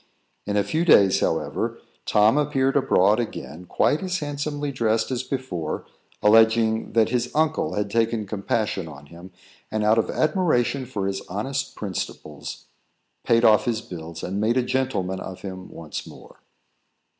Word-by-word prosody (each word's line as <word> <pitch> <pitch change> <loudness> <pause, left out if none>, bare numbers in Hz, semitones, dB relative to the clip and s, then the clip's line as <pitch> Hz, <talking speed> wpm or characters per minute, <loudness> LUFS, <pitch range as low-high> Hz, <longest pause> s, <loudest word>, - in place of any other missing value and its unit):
In 105 0 0
a 100 - +3
few 160 +9 0
days, 100 - +6
however, - - -1 0.3
Tom 105 +3 +4
appeared 135 -2 +1
abroad 105 -6 +3
again, 85 - -5
quite 145 - +1
as 185 -1 -1
handsomely 145 -1 -3
dressed 115 -2 0
as 125 -1 -1
before, 130 - -4 0.4
alleging 110 +1 +4
that 115 -1 +3
his 120 0 0
uncle 155 0 +1
had 105 -1 -2
taken 115 -1 +1
compassion 100 -2 -2
on 75 -2 -11
him, 85 +4 -13 0.4
and, 110 0 -1
out 110 +2 +4
of - - 0
admiration 140 -6 +1
for 105 -6 -3
his 95 0 -2
honest 135 +8 -3
principles, 80 -6 -6 0.6
paid 115 0 +3
off 110 -1 +5
his 115 -3 -1
bills 85 -4 -8
and 95 +3 -2
made 115 +3 +2
a 130 - +3
gentleman 120 -8 -1
of 95 -1 -8
him 95 -2 -7
once 80 -2 -7
more. - - -14
110 Hz, 155 wpm, -24 LUFS, 95-130 Hz, 0.6 s, days